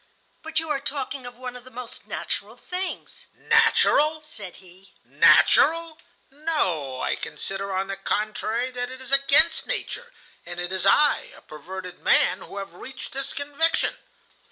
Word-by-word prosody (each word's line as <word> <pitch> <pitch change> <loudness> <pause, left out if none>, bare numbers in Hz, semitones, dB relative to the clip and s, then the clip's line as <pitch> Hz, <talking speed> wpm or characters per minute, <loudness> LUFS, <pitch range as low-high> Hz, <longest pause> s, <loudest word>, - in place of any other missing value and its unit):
"But 320 0 -5
you 320 +1 +1
are 285 - 0
talking 270 -2 -4
of 245 - -10
one 250 0 -7
of 250 - -10
the 255 - -13
most 250 -1 -9
natural - - -4
things." 370 +1 -3
"Natural!" 310 +2 +4
said 210 -12 -9
he. 185 +1 -17
"Natural! 330 0 +5 0.3
No, 185 - -1
I - - 0
consider 195 0 -5
on 190 0 0
the 195 0 -5
contrary 215 +5 -1
that 245 0 -4
it 260 0 -9
is 260 0 -9
against 275 +4 +4
nature, - - -4 0.3
and 175 - -7
it 175 +1 -3
is 190 0 0
I, 295 - +4
a - - -15
perverted 180 +4 -9
man, - - +3
who - - -10
have 195 -3 -6
reached 255 +8 -9
this 270 0 -2
conviction. 290 +3 0
250 Hz, 155 wpm, -25 LUFS, 195-295 Hz, 0.3 s, Natural